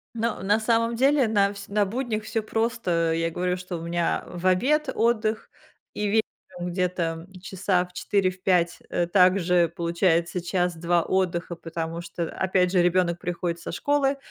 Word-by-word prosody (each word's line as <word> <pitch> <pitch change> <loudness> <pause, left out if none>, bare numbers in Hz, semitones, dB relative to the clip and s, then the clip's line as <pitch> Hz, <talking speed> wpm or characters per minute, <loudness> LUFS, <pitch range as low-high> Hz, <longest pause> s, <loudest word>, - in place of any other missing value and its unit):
Ну, 225 -4 -2
на 205 +3 +3
самом 230 +1 +1
деле, 270 +1 +3
на 205 -2 +2
всь 200 0 -10
на 205 0 +1
буднях 220 0 -3
всё 225 +1 -2
просто. 215 -8 0
Я 165 0 0
говорю, 180 +1 -1
что 180 -1 -6
у 165 - -8
меня 170 0 -1
в 175 +1 -8
обед 260 +11 +2
отдых, 220 -1 0 0.5
и 210 - -1
вечером 190 -4 -3
где-то 175 -2 -2
часа 185 0 0
в 180 - -20
4, 195 0 +1
в 185 0 -11
5, 175 -2 +2
э, 175 - 0
также 180 -2 +3
получается 170 +1 +1
час-два 175 -1 0
отдыха, 180 -2 -1
потому 165 0 -5
что, 170 -1 -5
опять 185 -1 +1
же, 180 -2 +3
ребёнок 175 -1 +2
приходит 175 -1 -3
со - - -6
школы, 280 +6 +1
180 Hz, 165 wpm, -25 LUFS, 170-215 Hz, 0.5 s, на